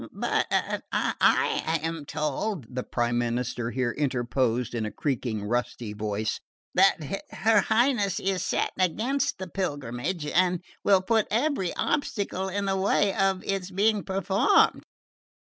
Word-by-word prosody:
"But - - 0
I 160 0 +1
am 165 -2 -3
told," 150 - -3
the 125 - -2
Prime 120 -1 -1
Minister 120 0 -2
here 125 -1 -1
interposed 125 -3 0
in 115 -2 -1
a 110 - -2
creaking 120 -7 -2
rusty 120 0 -2
voice, 105 +1 -2 0.3
"that 185 -3 +4 0.3
her 220 -1 +3
Highness 220 -4 +2
is 190 -2 -1
set - - 0
against 225 - 0
the 185 - -6
pilgrimage 150 -2 -3
and 180 +2 +1 0.2
will 195 -2 +4
put 220 +2 +2
every 235 - 0
obstacle 200 -7 -1
in 200 +1 -2
the 195 0 0
way 195 +1 +2
of 195 -1 +1
its 195 -2 -2
being 205 +2 +2
performed." 195 0 +3
180 Hz, 130 wpm, -27 LUFS, 120-195 Hz, 0.3 s, that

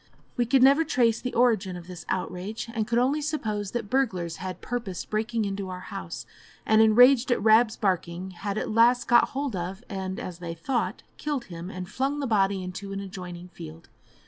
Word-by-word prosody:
We 240 -1 +1
could 255 +1 +4
never 280 +4 +6
trace 240 -7 +2
the 250 - -4
origin 220 -6 +2
of 175 -1 -8
this 180 -1 -10
outrage, 185 +4 -3
and 220 -3 -1
could 235 0 +1
only 270 +5 +2
suppose 215 -10 -2
that 230 0 -3
burglars 185 -10 0
had 185 0 -6
purposed 230 -7 -5
breaking 220 +1 0
into 195 -1 -3
our 180 0 -5
house, 85 -1 -6 0.4
and, 220 0 +5
enraged 245 +3 +6
at - - +3
Rab's 220 +1 +5
barking, 185 -2 -1
had 195 +3 -4
at - - -2
last 240 +2 +4
got 240 0 +5
hold 275 -4 -3
of, 185 +4 -5
and, 190 -1 -4
as 180 -1 -6
they 170 -1 -5
thought, 240 +9 -2
killed 290 -4 -2
him, 170 +2 -6
and 185 -2 -6
flung 270 +7 -1
the 285 - -1
body 195 -4 +2
into 190 +2 -6
an 195 - -3
adjoining 180 -2 -8
field. 80 - -11
210 Hz, 195 wpm, -26 LUFS, 185-245 Hz, 0.4 s, never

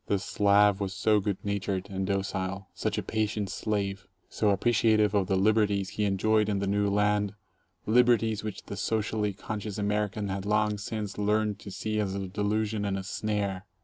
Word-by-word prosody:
The 100 - +2
Slav 100 +1 +3
was 95 -2 -3
so 105 +2 +3
good 100 -1 -1
natured, 100 -1 -2
and 95 -1 -3
docile, 95 0 -2
such - - -2
a - - -1
patient 110 -2 -1
slave, 100 -2 -2 0.2
so 105 - +1
appreciative 110 0 +3
of 100 -3 +2
the 95 - +1
liberties 100 -1 +2
he 105 0 -1
enjoyed 105 +2 +2
in 100 - 0
the 100 - -1
new 100 +1 +1
land 105 0 +1 0.3
— - - -43
"liberties" 115 -3 +4
which 110 -2 -5
the 100 - -7
socially 105 0 0
conscious 105 +1 -5
American 105 0 -1
had 95 0 -3
long 105 0 +1
since 105 -1 -4
learned 105 0 +1
to - - -9
see 110 +3 -2
as 100 -2 -1
a 100 -1 -3
delusion 105 +2 -1
and 100 -1 -1
a 95 - -4
snare. 100 -1 -2
105 Hz, 180 wpm, -28 LUFS, 100-105 Hz, 0.3 s, liberties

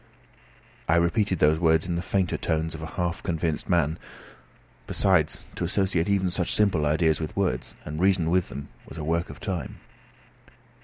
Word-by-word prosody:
I 80 - +5
repeated 90 +3 +2
these 75 +1 +3
words 80 -1 +3
in 90 - -1
the 85 - -1
fainter 95 -1 0
tones 80 -1 -1
of 80 - -7
a 80 - -7
half 90 -1 -2
convinced 80 -3 -2
man. 80 -3 +2 0.9
Besides, 90 -6 +2
to - - -4
associate 95 -3 +1
even 95 -2 +2
such 90 -1 -1
simple 95 -8 +3
ideas 80 0 +2
with 80 +2 -5
words, 90 -11 -1
and 75 +1 -5
reason 90 -4 +3
with 90 0 +2
them, 70 +1 -7 0.2
was - - -10
a 80 - -4
work 85 +3 0
of - - -10
time. 95 -9 -4
85 Hz, 170 wpm, -26 LUFS, 80-95 Hz, 0.9 s, I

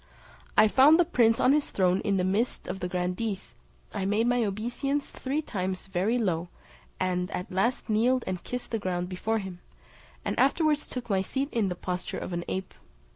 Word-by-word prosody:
I 215 - +8
found 280 +9 +6
the 350 - +5
prince 230 -8 +3
on 260 - +5
his 300 -1 +1
throne 185 -1 +2
in 200 -2 +1
the 180 - +1
midst 205 +7 0
of 185 +1 -4
the 180 - -2
grandees; 185 +3 -2 0.4
I 200 - -2
made 210 +3 +2
my 245 0 +2
obeisance 240 +8 -2
three 280 +4 -2
times 185 -6 -3
very 195 +5 0
low, 180 -6 0 0.5
and 180 -1 0
at 180 - -5
last 195 +7 0
kneeled 240 +4 +2
and 185 -2 -4
kissed 250 0 -5
the 225 - 0
ground 180 -2 -2
before 220 +5 -1
him, 190 -4 -6 0.7
and - - -1
afterwards 295 +3 +3
took 250 -2 -5
my 190 -1 +3
seat 270 +8 -2
in 220 -5 +1
the 180 - -3
posture 180 0 -4
of 185 - -5
an 175 0 -2
ape. 190 0 -4
205 Hz, 190 wpm, -28 LUFS, 185-245 Hz, 0.7 s, I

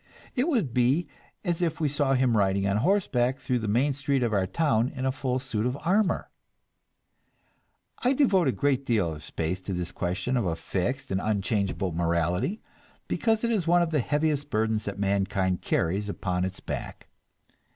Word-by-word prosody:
It 255 +3 +1
would 225 - 0
be 130 +7 +2 0.4
as 175 -1 0
if 165 -2 0
we 155 - +2
saw 140 -1 +1
him 125 -2 +2
riding 100 -1 +2
on 100 +1 +1
horseback 130 - +2
through 125 -2 -1
the 110 - -3
main 125 +7 +2
street 135 -1 0
of 115 -2 0
our 95 -2 +2
town 125 - +1
in 130 -2 -5
a 130 - +2
full 130 -1 -1
suit 125 -5 -2
of 125 +3 -1
armor! 195 +3 +1 1.7
I 255 +2 +2
devote 200 - +3
a - - +4
good 140 0 +1
deal 105 -11 +1
of 75 - -9
space 85 +4 -3
to 95 - -4
this 90 -1 -3
question 95 +8 -1
of 120 - 0
a 80 - 0
fixed 95 +10 -3
and 95 +1 0
unchangeable 100 -2 0
morality, 85 - 0 0.4
because 225 -1 +1
it 235 - +1
is 195 -7 0
one 175 +1 +5
of 165 - -2
the 150 - +2
heaviest 145 +2 0
burdens 110 -1 0
that 100 -1 -4
mankind 95 -2 0
carries 100 +5 0
upon 90 -2 -1
its 95 0 -6
back. - - -6
125 Hz, 180 wpm, -27 LUFS, 95-145 Hz, 1.7 s, one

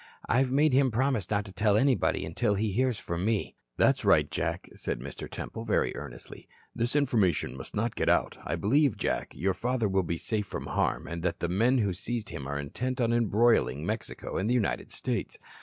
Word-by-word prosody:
I've 130 +2 +3
made 145 +2 +3
him 135 0 +4
promise 125 -3 0
not 105 -1 0
to 95 - -10
tell 105 +2 +3
anybody 130 +2 +2
until 100 +6 0
he 105 +1 0
hears 125 +2 +1
from 85 -2 -4
me." 110 0 0 0.2
"That's - - +3
right, - - +4
Jack," - - -2
said - - -4
Mr. 70 +3 -7
Temple, 115 - -6
very 110 - +1
earnestly. - - -9 0.3
"This 120 +4 -1
information 105 - +2
must 65 - -8
not 110 +2 0
get - - +1
out. - - +2
I - - -2
believe, 135 +4 +2
Jack, - - -2
your 95 +3 0
father 120 +3 0
will 95 -1 +2
be 85 -1 -2
safe 105 +2 -2
from - - -5
harm - - -1
and 85 0 -5
that 90 - -1
the 85 - -1
men 115 +9 +3
who 100 -6 +1
seized 115 +4 -4
him 75 -5 -6
are 70 +1 -2
intent 125 - -3
on 115 -1 +2
embroiling 115 - +3
Mexico - - -4
and 100 +4 0
the 125 - +3
United 115 -5 0
States. - - -3
110 Hz, 205 wpm, -29 LUFS, 95-125 Hz, 0.3 s, him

